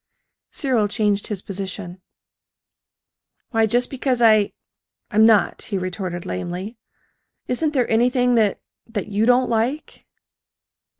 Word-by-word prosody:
Cyril 245 -7 0
changed 205 -1 0
his 205 -4 -5
position. 190 -1 -6 1.5
"Why, 225 -2 +2
just 245 +3 +1
because 260 -2 -1
I 215 -3 +4 0.6
I'm 220 0 +5
not," 220 -3 +3
he 200 - -3
retorted 185 -1 -4
lamely. 180 - -5 0.7
"Isn't 300 +5 -1
there 250 -3 +2
anything 245 +2 +2
that 220 -4 +2 0.3
that 215 -3 -4
you 210 +2 +1
don't 250 +1 +4
like?" 240 +6 -2
220 Hz, 115 wpm, -21 LUFS, 200-245 Hz, 1.5 s, I'm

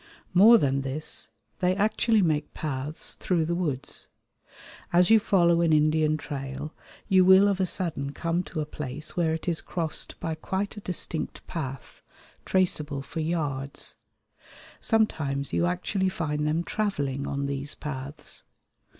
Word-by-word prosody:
More 215 +6 +8
than 135 -7 +1
this, 135 +3 -2 0.3
they 180 0 +2
actually 215 +1 +2
make 155 -3 0
paths 150 0 0
through 170 -4 0
the 170 - -1
woods. 155 -7 -3 0.8
As 175 +3 +4
you 225 - +8
follow 170 -5 +3
an 165 -1 +3
Indian 155 0 +3
trail 140 0 -6 0.3
you 185 -1 +5
will 190 +2 +7
of 200 -2 +1
a 190 - +2
sudden 160 -7 -1
come 165 +3 -1
to 155 - -4
a - - -2
place 150 0 -6
where 170 -2 +2
it 160 - -7
is 170 -2 0
crossed 165 -3 -3
by 165 - -2
quite 190 +6 -3
a - - -7
distinct 170 -3 -3
path, 135 -6 -6 0.4
traceable 150 -7 +1
for 160 - -6
yards. 150 -4 -2 0.9
Sometimes 140 -11 0
you 175 - +2
actually 185 +2 0
find 150 -4 -2
them 160 +3 +1
travelling 145 -11 -2
on 140 0 -2
these 140 +1 -4
paths. 145 0 -7
160 Hz, 145 wpm, -27 LUFS, 145-180 Hz, 0.9 s, More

